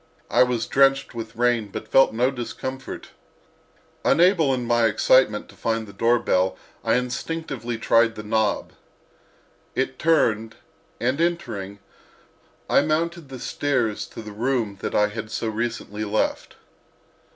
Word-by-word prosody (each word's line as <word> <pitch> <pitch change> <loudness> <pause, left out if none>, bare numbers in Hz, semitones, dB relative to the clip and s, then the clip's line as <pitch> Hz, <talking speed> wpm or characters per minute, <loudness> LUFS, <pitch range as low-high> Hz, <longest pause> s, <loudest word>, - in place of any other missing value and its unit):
I - - +4
was 125 -2 +2
drenched 135 0 +3
with 115 -1 -7
rain, 120 -2 +1
but 100 - -7
felt 135 - +5
no 125 +4 +1
discomfort. 130 +1 -6 0.9
Unable 170 -4 +4
in 125 -2 -1
my 120 -1 +3
excitement 110 0 +3
to - - -15
find 115 -1 -1
the 100 - -12
doorbell 100 -4 +2 0.3
I - - +2
instinctively 125 -1 -3
tried 115 0 +3
the 105 - -7
knob. 110 -1 0 1.0
It 130 0 -1
turned 115 -9 +2 0.4
and, 130 +6 0
entering, 165 - -2 0.9
I - - +4
mounted 160 +1 -1
the 130 - -7
stairs 125 -4 -1
to 115 - -9
the 105 - -8
room 110 -2 -1
that - - -3
I 105 0 +3
had 110 +1 -6
so 115 - -2
recently 110 -1 -3
left. 110 +1 -1
120 Hz, 135 wpm, -24 LUFS, 110-135 Hz, 1.0 s, felt